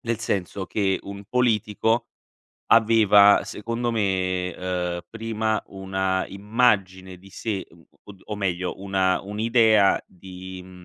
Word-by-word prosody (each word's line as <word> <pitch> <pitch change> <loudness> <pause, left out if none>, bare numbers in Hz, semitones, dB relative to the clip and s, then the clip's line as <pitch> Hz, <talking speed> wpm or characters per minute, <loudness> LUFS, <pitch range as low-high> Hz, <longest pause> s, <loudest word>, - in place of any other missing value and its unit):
Nel 115 -1 -2
senso 95 -3 -3
che 95 -1 0
un 100 0 -9
politico 115 -1 +1 0.7
aveva, 105 -3 +6
secondo 115 +4 -3
me, 95 -4 -1
uhm, 90 -1 -3
prima 110 -1 -2
una 95 -1 -2
immagine 100 -3 0
di 95 +2 -17
sé, 100 -1 -4 0.4
o 100 - -11
d 95 - -20
o 105 - -6
meglio 90 -2 -3
una 95 -1 +1
un'idea 110 0 +3
di, 95 0 -10
mhmm 90 -1 -14
100 Hz, 120 wpm, -24 LUFS, 95-110 Hz, 0.7 s, aveva